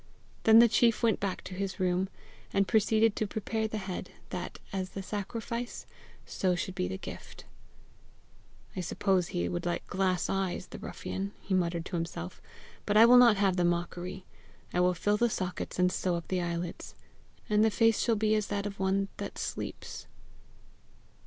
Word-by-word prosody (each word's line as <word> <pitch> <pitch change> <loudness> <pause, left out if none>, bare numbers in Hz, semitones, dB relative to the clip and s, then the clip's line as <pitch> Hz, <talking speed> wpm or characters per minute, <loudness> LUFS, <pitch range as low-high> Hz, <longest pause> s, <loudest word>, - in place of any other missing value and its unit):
Then 220 0 +8
the 235 +1 +9
chief 230 +1 +3
went 225 -2 +3
back 195 -2 -3
to - - -8
his 195 +1 -4
room, 185 +1 +1 0.4
and 195 -1 +2
proceeded 220 0 +3
to 215 - -1
prepare 220 +1 -2
the 215 - -4
head, 190 -2 -5 0.2
that, 180 -2 -5 0.2
as 190 -1 -2
the 195 - -6
sacrifice, 230 +4 -4 0.4
so 185 -2 0
should 185 +1 -3
be 90 - -1
the 95 +1 -4
gift. - - -9 1.3
"I - - -3
suppose 185 0 +1
he 85 0 -1
would 85 0 -3
like 175 - -2
glass 185 -1 0
eyes, 190 -1 -1
the - - -10
ruffian!" 195 +1 -5
he 195 - -4
muttered 170 -2 0
to 185 - -4
himself, 165 - -5 0.5
"but 205 - +3
I 225 - +10
will 245 +1 +8
not 235 -4 +7
have 195 -2 +2
the 180 - +2
mockery. 175 +2 -2 0.5
I - - +1
will 180 0 +3
fill 205 +5 +1
the 240 +2 +3
sockets 185 -4 -3
and 180 0 +3
sew 180 -1 0
up 170 - -6
the 185 -1 0
eyelids, 170 0 -4 0.5
and 210 0 +3
the 220 - +5
face 225 +1 +3
shall 230 - +2
be 215 0 +2
as 215 -1 0
of 200 -1 -3
one 195 +1 +1
that - - -6
sleeps." - - -5
195 Hz, 180 wpm, -30 LUFS, 180-215 Hz, 1.3 s, I